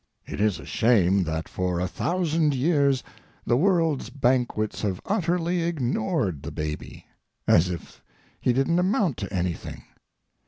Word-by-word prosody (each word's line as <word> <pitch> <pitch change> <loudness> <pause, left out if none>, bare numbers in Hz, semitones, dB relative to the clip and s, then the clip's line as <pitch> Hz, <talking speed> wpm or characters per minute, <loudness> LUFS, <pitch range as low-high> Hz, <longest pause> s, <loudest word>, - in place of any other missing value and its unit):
It - - -5
is 105 -3 +2
a - - -10
shame 100 -5 +3
that 80 +1 -3
for 90 -1 -2
a 90 - 0
thousand 160 - 0
years 140 -1 +2 0.4
the 120 - +3
world's 165 -4 +2
banquets 125 -4 0
have 95 -4 -1
utterly 175 -3 0
ignored 125 - -1
the - - -6
baby, 75 0 -5 0.4
as 90 +2 +5
if 85 -2 -7 0.4
he - - +2
didn't 135 +8 +2
amount 185 - +1
to 100 - -5
anything. 90 -3 -3
125 Hz, 140 wpm, -25 LUFS, -, 0.4 s, as